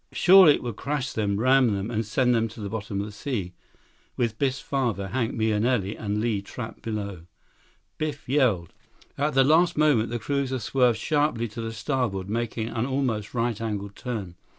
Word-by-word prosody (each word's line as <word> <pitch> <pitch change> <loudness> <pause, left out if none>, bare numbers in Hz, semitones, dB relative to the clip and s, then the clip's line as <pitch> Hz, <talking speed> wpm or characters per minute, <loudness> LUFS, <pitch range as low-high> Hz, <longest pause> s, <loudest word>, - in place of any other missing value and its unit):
Surely 180 -4 +7
it - - -7
would 120 -4 -5
crash 140 -3 -2
them, 100 -2 0
ram 130 -2 +4
them, 115 -2 -1
send 125 +3 +1
them 115 -1 +2
to 115 +1 -12
the 100 -2 -5
bottom 105 -2 -4
of 100 - -2
the 105 - -8
sea, 105 -5 -4 0.6
with 115 -3 -1
Biff's 135 -1 0
father, 115 -8 -2
Hank 120 -1 -1
Mahenili, 110 -1 +1
and 105 -1 -2
Li 110 -3 0
trapped 110 +3 -8
below. 100 -6 -5 0.7
Biff 150 -3 -4
yelled. 120 - +1 0.4
105 140 - -2
At 150 - +1
the 135 - +6
last 160 +5 +4
moment, 145 -7 +3
the 120 - -2
cruiser 135 +2 -1
swerved 125 0 +2
sharply 145 -2 0
to 115 - -7
the 115 0 -4
starboard, 110 -5 -2
making 115 -1 -2
an 120 +1 -2
almost 125 -6 -2
right 115 -2 -1
angle 105 -3 -3
turn. 100 -4 -5
115 Hz, 180 wpm, -26 LUFS, 105-130 Hz, 0.7 s, Surely